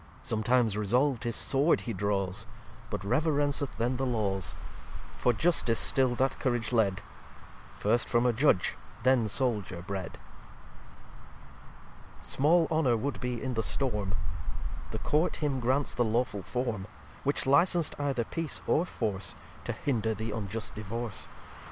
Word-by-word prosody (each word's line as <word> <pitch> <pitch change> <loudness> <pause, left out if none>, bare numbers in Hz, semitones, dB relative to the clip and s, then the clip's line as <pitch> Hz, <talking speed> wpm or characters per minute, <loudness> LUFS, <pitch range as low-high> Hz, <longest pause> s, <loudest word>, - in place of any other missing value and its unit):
Sometimes 115 0 +2
resolv'd 125 +4 +2
his 115 - 0
Sword 140 +5 +3
he 115 - -4
draws, 100 -1 -1 0.4
But - - -4
reverenceth 145 +3 +1
then 120 +2 0
the 135 - 0
Laws: 100 -7 -1 0.6
For 125 - +3
Justice 120 -3 +2
still 130 0 +2
that 135 +2 0
Courage 120 -3 0
led; 100 -5 +2 0.7
First 115 +4 +1
from 120 0 +3
a 120 - +4
Judge, 115 -6 +3 0.3
then 130 -3 +4
Souldier 105 -6 -1
bred. 95 -2 -4 2.0
xxx - - -15
Small 160 +4 +3
Honour 145 -7 +3
would 140 +5 -3
be 125 -2 -3
in 130 -1 -1
the 110 - 0
Storm. 105 -6 -1 0.7
The - - -4
Court 155 +4 +1
him 145 -4 -1
grants 130 +4 +1
the 120 - +2
lawful 115 -2 0
Form; 110 -2 -3 0.4
Which 140 +1 +1
licens'd 170 +4 +3
either 140 -4 0
Peace 165 +6 -2
or 165 - +2
Force, 100 - -1 0.3
To - - -1
hinder 110 -5 -1
the 110 +2 -4
unjust 105 +1 -3
Divorce. 110 +1 -4
120 Hz, 140 wpm, -30 LUFS, 105-135 Hz, 2.0 s, a